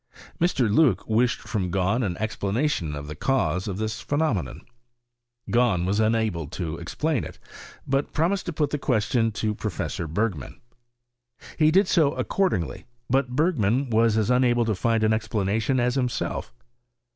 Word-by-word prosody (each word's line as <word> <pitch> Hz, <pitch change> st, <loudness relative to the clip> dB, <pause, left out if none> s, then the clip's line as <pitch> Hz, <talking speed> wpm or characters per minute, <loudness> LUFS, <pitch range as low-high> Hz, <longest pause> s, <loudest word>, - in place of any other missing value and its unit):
Mr. 165 Hz, -8 st, +2 dB
Loock 130 Hz, +6 st, +3 dB
wished 120 Hz, +3 st, +1 dB
&OID 95 Hz, -5 st, -2 dB
Gahn 95 Hz, +6 st, +1 dB
an 90 Hz, -5 st, -2 dB
explanation 110 Hz, -, -1 dB
of 70 Hz, 0 st, -6 dB
the 75 Hz, -, -6 dB
cause 95 Hz, -, 0 dB
of 95 Hz, -2 st, -3 dB
this 110 Hz, +1 st, -3 dB
phe 145 Hz, -, -2 dB
nomenon: 110 Hz, -, -1 dB, 0.9 s
Galin 115 Hz, -8 st, +2 dB
was 100 Hz, +3 st, 0 dB
unable 110 Hz, -7 st, +1 dB
to 80 Hz, +1 st, -4 dB
explain 140 Hz, -, -1 dB
it; -, -, -9 dB, 0.5 s
but 135 Hz, +1 st, 0 dB
pro 165 Hz, +3 st, +1 dB
mised 200 Hz, 0 st, -2 dB
to 175 Hz, -, -3 dB
put 150 Hz, -2 st, 0 dB
tiie 150 Hz, -, -2 dB
question 115 Hz, -1 st, +1 dB
to 105 Hz, +1 st, -1 dB
Professor 100 Hz, -5 st, -4 dB
Bei^;rwn. 90 Hz, -, -2 dB, 1.0 s
He 155 Hz, -1 st, +4 dB
did 190 Hz, +4 st, +4 dB
so 155 Hz, -7 st, +3 dB
accordingly, 185 Hz, -, -1 dB, 0.3 s
but 130 Hz, -1 st, +1 dB
Bergman 135 Hz, -, +1 dB
was 115 Hz, 0 st, +3 dB
as 110 Hz, +2 st, +1 dB
unable 120 Hz, -1 st, +3 dB
to 110 Hz, -, +1 dB
find 115 Hz, +2 st, +1 dB
an 110 Hz, 0 st, +3 dB
explanation 110 Hz, +3 st, 0 dB
as 125 Hz, 0 st, +1 dB
himself. 125 Hz, -, -2 dB
115 Hz, 155 wpm, -25 LUFS, 100-135 Hz, 1.0 s, He